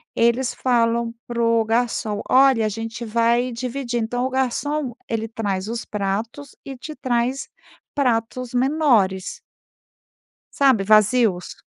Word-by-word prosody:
eles 235 +2 +2
falam 235 -2 +1
pro 230 -1 +1
garçom: 225 -2 -1
"Olha, 260 -4 +5
a - - +1
gente 225 +2 -6
vai 235 +2 +1
dividir.". 245 0 -3
Então, 245 +3 -2
o - - -1
garçom 265 +1 -1
ele 225 -1 -2
traz 205 -4 -3
os 230 +1 -4
pratos 215 +7 -4
e 270 -1 -7
te 310 +5 -8
traz 255 +1 -1 0.5
pratos 250 -2 -1
menores. 245 -9 +1 1.2
Sabe, 265 -7 +4
vazios? 215 -2 +3
235 Hz, 120 wpm, -22 LUFS, 225-255 Hz, 1.2 s, Olha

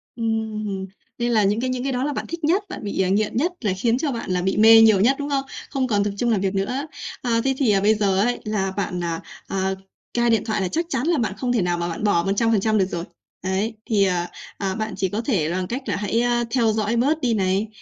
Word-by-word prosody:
Ừm, 215 -4 -2 0.3
nên 240 0 0
là 215 -2 +4
những 205 +3 +2
cái 255 - -1
những 255 -1 -2
cái 270 - -1
đó 250 +1 -1
là 295 0 -1
bạn - - -4
thích 335 0 -6
nhất, 360 +7 +2
bạn - - -7
bị, 200 -2 -1
à, 185 - +1
nghiện 210 +3 +1
nhất 340 +7 +1
là 205 -5 0
khiến 235 +3 +1
cho 285 +1 -1
bạn 230 -5 -5
là 180 -1 +1
bị 190 +1 0
mê 225 +1 +8
nhiều 215 -4 +6
nhất, 250 +7 +4
đúng 285 - -3
không? 275 -1 0 0.2
Không 265 -3 -1
còn 205 -3 +2
tập 205 - -1
trung 240 - 0
làm 200 -3 +1
việc 195 0 0
nữa. 250 +10 -1 0.3
À, 230 -2 +1
thế 270 0 +2
thì, 255 -7 +3
ờ, 195 -1 +3
bây 215 +2 +4
giờ 195 -2 +1
ấy 245 +3 +1
là 195 -3 -1
bạn, 180 -3 -2
à, 165 -1 -2 0.3
à, 190 0 -1 0.4
cai 240 0 +2
điện 225 -3 +3
thoại 215 -3 -1
là 185 - 0
chắc 335 - -1
chắn 270 -1 -1
là 340 -3 +3
bạn 225 -5 0
không 245 0 -1
thể 230 - +2
nào 175 -1 0
mà 170 0 -2
bạn 165 - -5
bỏ 170 -5 +3
100% 215 +2 +2
được 190 - +3
rồi. 175 -2 -4 0.4
Đấy, 195 +4 -1
thì, 210 -3 +2
ờ, 180 -2 0 0.3
ờ, 195 0 -2
bạn 215 -1 -3
chỉ 190 - 0
có 210 +4 -2
thể 195 - 0
bằng 185 0 -2
cách 255 +4 -3
là - - -1
hãy, 210 +3 0
a, 240 0 +1
theo 235 -4 +3
dõi 220 +1 0
bớt 290 +7 +1
đi 240 -3 +1
này, 195 0 +1
220 Hz, 275 wpm, -22 LUFS, 195-245 Hz, 0.4 s, mê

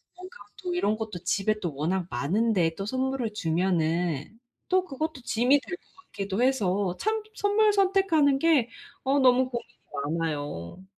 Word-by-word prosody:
뭔가 365 +1 -11 0.3
또 360 -1 -2
이런 215 -12 +1
것도 210 -6 -6
집에 215 +4 +1
또 170 -6 -3
워낙 175 +5 -1
많은데 170 - +1
또 195 - -4
선물을 260 -1 -2
주면은 170 -1 0 0.3
또 370 0 +3
그것도 310 -2 -4
짐이 245 +5 +3
될 360 - -6
것 - - -33 0.2
같기도 200 +3 -1
해서 200 -8 +1
참 440 +1 0
선물 415 +1 +3
선택하는 375 -8 +3
게 290 -7 +3 0.3
어 275 +2 +2
너무 255 -1 +4
고민이 240 -1 -6 0.5
많아요. 145 - -4
225 Hz, 285 characters per minute, -27 LUFS, 180-285 Hz, 0.5 s, 너무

